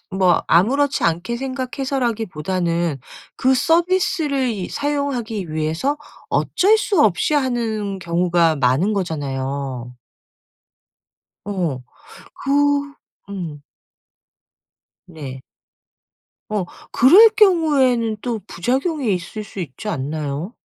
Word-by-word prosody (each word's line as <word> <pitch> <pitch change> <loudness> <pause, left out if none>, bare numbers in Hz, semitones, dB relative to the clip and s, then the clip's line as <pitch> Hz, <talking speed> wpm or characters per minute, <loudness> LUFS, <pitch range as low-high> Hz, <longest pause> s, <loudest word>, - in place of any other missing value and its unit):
뭐 185 -2 +3
아무렇지 270 +11 +3
않게 175 +8 0
생각해서라기보다는 225 - -2 0.4
그 260 +1 +3
서비스를 325 -3 +1
이 205 -6 -3
사용하기 250 - -2
위해서 160 - -1 0.3
어쩔 415 +4 +3
수 410 -5 +1
없이 220 - +2
하는 225 -7 -1
경우가 170 -2 +2
많은 135 +10 +2
거잖아요. 135 - -3 1.5
어. 175 -10 -2 0.6
그 275 - -1 0.8
음. 165 -7 -6 1.4
네. 140 -6 -8 1.1
어. 205 -3 0 0.3
그럴 390 - +7
경우에는 275 - +3
또 235 -4 -2
부작용이 260 - -1
있을 185 +4 -6
수 200 - -8
있지 165 +5 -7
않나요? 150 - -3
205 Hz, 200 characters per minute, -20 LUFS, 165-265 Hz, 1.5 s, 그럴